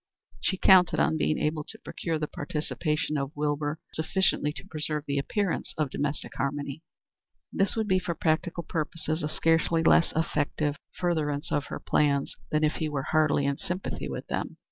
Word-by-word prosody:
She 190 - 0
counted 185 -2 +6
on - - +3
being 155 - +2
able 150 0 0
to - - -8
procure 165 -2 -3
the 155 - -1
participation 150 0 -2
of 140 +2 -4
Wilbur 145 +1 -1 0.2
sufficiently 160 -2 +1
to 195 - -9
preserve 150 -3 -3
the 140 -1 0
appearance 195 +6 -1
of 150 -4 0
domestic 145 0 -2
harmony. 140 +1 -2 0.7
This 195 0 +1
would 220 -2 0
be 185 -2 +3
for 175 -2 -3
practical 170 +2 0
purposes 160 0 -2
a 150 - -1
scarcely 165 +1 +2
less 165 - +5
effective 150 -2 0 0.2
furtherance 150 -5 0
of 145 -1 +1
her - - -5
plans 140 -2 +1
than 155 0 +1
if 155 - +2
he 155 - -1
were 140 -2 -2
heartily 155 -2 +3
in 140 0 0
sympathy 185 0 -3
with - - -5
them. - - -3
155 Hz, 170 wpm, -28 LUFS, 145-165 Hz, 0.7 s, counted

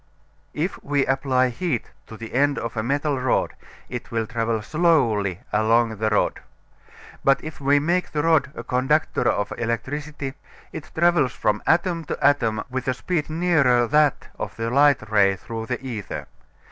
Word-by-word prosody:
If 165 +5 -3
we 140 -1 +1
apply 130 -1 +1
heat 130 -1 -3 0.2
to 110 - -10
the 115 0 -9
end 140 +2 +2
of 115 0 -4
a 110 - 0
metal 140 +3 0
rod 125 -1 0 0.3
it 125 -1 -6
will 115 -1 -1
travel 115 -2 -2
slowly 115 - +1
along 115 0 +2
the 110 +1 0
rod. 105 - +1 0.8
But 135 0 +3
if 155 -2 -8
we 140 +1 +4
make 175 +5 0
the 150 -1 -1
rod 160 -4 +3
a - - -6
conductor 135 +4 +1
of 105 - -1
electricity 135 +4 -3 0.4
it 155 - -8
travels 170 -5 +3
from 105 0 0
atom 170 0 +2
to - - -4
atom 120 -6 +2
with 130 0 -4
a 130 - +1
speed 160 +1 -2
nearer 155 -7 +3
that 150 +3 +2
of - - -5
the 115 0 -3
light 140 -4 +4
ray 100 -2 +4
through 110 +2 -7
the 125 - -2
ether. 115 -6 -5
130 Hz, 165 wpm, -23 LUFS, 115-150 Hz, 0.8 s, we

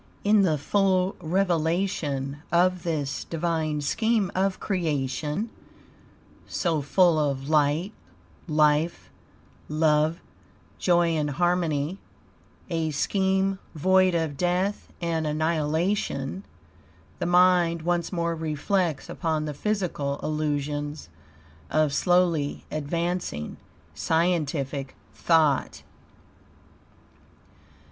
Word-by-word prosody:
In 210 0 +5
the 165 -6 +2
full 185 +4 +1
revelation 160 -5 0
of 180 +1 +3
this 155 -5 -2
divine 160 -2 -1
scheme 220 +5 +1
of 190 0 0
creation, 155 - -2 1.0
so 165 -4 0
full 170 +3 +3
of 140 -2 -1
light, 155 +6 +2 0.5
life, 150 +2 +1 0.6
love, 155 +1 +2 0.6
joy 175 -1 +3
and 155 -3 0
harmony, 170 +1 0 0.7
a 165 -3 -1
scheme 190 +5 +1 0.2
void 185 +3 +3
of 160 -4 -1
death 180 +4 -1
and 165 -2 -1
annihilation, 155 +1 -1 0.7
the - - -1
mind 175 -2 +4
once 175 0 0
more 170 -2 -1
reflects 160 +1 -1
upon 160 -3 -2
the 150 - -4
physical 165 -6 -2
illusions 150 -1 -2 0.6
of 155 -2 +2
slowly 175 -4 +1
advancing 155 - -3 0.4
scientific 150 -5 -1 0.2
thought. 155 -5 +2
165 Hz, 85 wpm, -26 LUFS, 150-180 Hz, 1.0 s, In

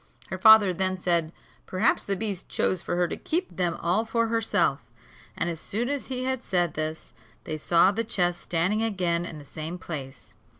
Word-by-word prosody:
Her - - -3
father 220 -4 +8
then 185 +1 -1
said, 170 -3 +1 0.4
perhaps 185 +4 +2
the 200 - -1
beast 200 -3 -3
chose 185 - +1
for - - -3
her 175 0 +2
to - - -4
keep 355 +3 -3
them 175 -2 0
all 180 +6 +1
for 230 0 0
herself; 225 -1 +1 0.6
and - - -1
as 165 -2 -3
soon 235 +8 -3
as 285 -1 -3
he 255 -1 -3
had 260 -1 -2
said 175 -4 0
this, 155 +1 -5 0.3
they 155 - -5
saw 170 +4 +4
the 225 +3 -1
chest 175 -5 0
standing 185 +6 0
again 180 -6 0
in 160 - -8
the 145 - -11
same 160 +5 -6
place. 135 - -8
185 Hz, 195 wpm, -26 LUFS, 170-220 Hz, 0.6 s, father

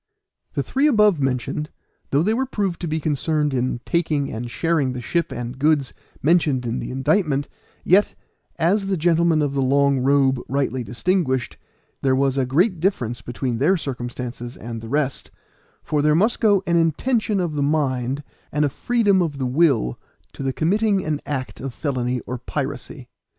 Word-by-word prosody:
The - - -1
three 275 +3 +1
above 210 - +4
mentioned, 135 +3 -1 0.4
though 140 +3 +2
they 215 +4 +2
were 260 +3 0
proved 195 -8 -2
to 175 - -2
be 160 0 -1
concerned 150 0 0
in 125 -1 -1
taking 155 -5 0
and 120 +2 -5
sharing 155 -2 0
the 125 - -5
ship 170 +7 -1
and 120 +2 -5
goods 145 -2 +2 0.3
mentioned 150 -5 +2
in 120 +1 -2
the - - -5
indictment, 140 +1 +1 0.4
yet, 195 +4 +3 0.4
as 195 +5 +2
the 195 -1 0
gentlemen 165 -1 +3
of 140 -1 -1
the 140 - 0
long 140 +1 +3
robe 135 0 +3
rightly 130 -1 -1
distinguished, 130 - -1 0.5
there 135 -1 +2
was 135 0 +1
a 135 -2 0
great 175 - +2
difference 125 - -1
between 120 -1 -3
their 180 +8 +3
circumstances 120 -3 -6
and 115 0 -6
the 115 - -8
rest; 140 -1 -1 0.5
for 150 -1 0
there 150 +1 +3
must 215 +8 +2
go 205 -4 +3
an 170 0 +2
intention 205 - +1
of 175 -4 -1
the 145 - -1
mind 140 -2 0 0.3
and 150 +1 +2
a - - +1
freedom 205 - +2
of 155 -5 -2
the 130 - -2
will 125 - +2 0.3
to - - -8
the 135 -1 0
committing 195 +6 +1
an 150 -2 -1
act 135 -3 -4
of 130 -2 -5
felony 125 -4 -1
or 125 0 -6
piracy. 140 0 -5
145 Hz, 175 wpm, -22 LUFS, 130-170 Hz, 0.5 s, above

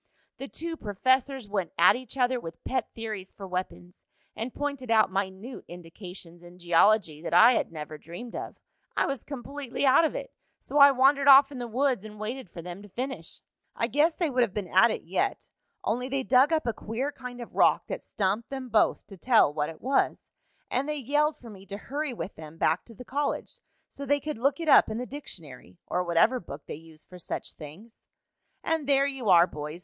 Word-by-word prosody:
The 275 - -6
two 330 +2 -5
professors 260 +3 0
went 195 -5 -3
at 175 - +6
each 255 +2 -8
other 250 0 +2
with 165 -7 -10
pet 260 - -1
theories 215 -4 -6
for 195 - -9
weapons, 180 -1 -6 0.3
and 230 +3 -4
pointed 280 -3 -4
out 220 -4 +4
minute 195 +5 -4
indications 175 0 -11
in 175 0 -14
geology 175 -1 +3
that 170 - -2
I 225 +7 +8
had - - -1
never 155 -1 -7
dreamed 175 +11 -9
of. - - -6 0.4
I - - +3
was 275 -4 -3
completely 280 -1 -4
out 265 +4 +6
of 320 - 0
it, - - -6 0.3
so 290 - -1
I 280 0 +10
wandered 275 +1 +3
off 275 0 +8
in 265 - -7
the 240 - -4
woods 255 -2 0
and 215 -1 -10
waited 225 0 -5
for 170 -1 -9
them 180 +2 -8
to 205 - -13
finish. 260 +7 -6 0.3
"I - - 0
guess 295 +7 +2
they 335 -5 -1
would 255 -1 +2
have 220 -5 0
been 200 -4 -3
at 225 +5 +7
it 220 - -3
yet, - - -2 0.4
only 250 +4 -1
they 270 0 -1
dug 260 +4 +4
up 315 -3 +1
a 235 - 0
queer 235 +8 -3
kind 250 -3 -9
of 240 - -9
rock - - +3
that - - -6
stumped 205 +3 -2
them 265 -2 -6
both 220 -1 +2
to 195 - -13
tell 220 - +4
what 150 -1 -1
it 165 - -11
was, 270 +2 0 0.4
and 270 +4 0
they 300 - -1
yelled 295 +3 +1
for 235 -3 -12
me 195 -2 -12
to 200 - -6
hurry 285 +6 -4
with 220 -4 -6
them 155 0 -11
back 160 +1 +1
to 230 - -14
the 250 - -11
college 285 +3 -3 0.3
so 280 - -9
they 285 +2 +3
could 300 -4 -5
look 275 +4 +1
it 330 - -4
up - - +7
in 215 - -3
the 250 - -3
dictionary 155 - -10
or 180 - -1
whatever 180 +9 +3
book 150 -6 -10
they - - -6
use 160 0 -13
for 180 - -13
such - - -5
things. 170 +10 -13 0.6
"And 320 -3 -1
there 275 0 +4
you 270 -6 -2
are, 175 -2 +7
boys. 150 0 -7
235 Hz, 215 wpm, -27 LUFS, 180-270 Hz, 0.6 s, I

